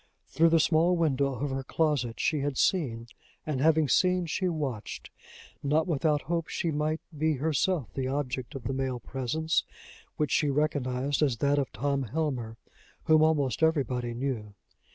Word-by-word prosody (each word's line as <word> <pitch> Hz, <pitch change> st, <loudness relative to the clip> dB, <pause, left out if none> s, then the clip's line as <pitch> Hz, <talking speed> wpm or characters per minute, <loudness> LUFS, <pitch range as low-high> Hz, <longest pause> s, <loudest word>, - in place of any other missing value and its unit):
Through 165 Hz, +1 st, +4 dB
the 165 Hz, 0 st, +4 dB
small 165 Hz, +3 st, +3 dB
window 140 Hz, -4 st, +1 dB
of 140 Hz, +3 st, -3 dB
her 135 Hz, 0 st, -3 dB
closet 135 Hz, -6 st, 0 dB
she 155 Hz, -, +1 dB
had 140 Hz, -1 st, -2 dB
seen, 125 Hz, -, +1 dB, 0.4 s
and 145 Hz, -4 st, -2 dB
having 160 Hz, 0 st, +4 dB
seen 180 Hz, +5 st, +3 dB
she 180 Hz, +3 st, -1 dB
watched 140 Hz, -10 st, -4 dB, 0.5 s
not 150 Hz, +3 st, +2 dB
without 150 Hz, -3 st, +1 dB
hope 165 Hz, +1 st, -2 dB
she 165 Hz, -, -2 dB
might 155 Hz, +1 st, -1 dB
be 155 Hz, +1 st, +1 dB
herself 155 Hz, +1 st, 0 dB
the 130 Hz, -1 st, -2 dB
object 130 Hz, -3 st, -3 dB
of 135 Hz, -, -6 dB
the 135 Hz, -, -2 dB
male 130 Hz, -2 st, -2 dB
presence, 140 Hz, +7 st, -1 dB, 0.5 s
which 150 Hz, -3 st, 0 dB
she 150 Hz, -, +2 dB
recognized 140 Hz, -2 st, 0 dB
as 135 Hz, -6 st, +2 dB
that 140 Hz, +3 st, +2 dB
of 135 Hz, -4 st, -2 dB
Tom 140 Hz, +5 st, -1 dB
Helmer, 125 Hz, -4 st, -3 dB, 0.5 s
whom 155 Hz, -1 st, +5 dB
almost 155 Hz, -3 st, +2 dB
everybody 125 Hz, -7 st, +1 dB
knew. 115 Hz, -5 st, -3 dB
145 Hz, 160 wpm, -28 LUFS, 130-160 Hz, 0.5 s, whom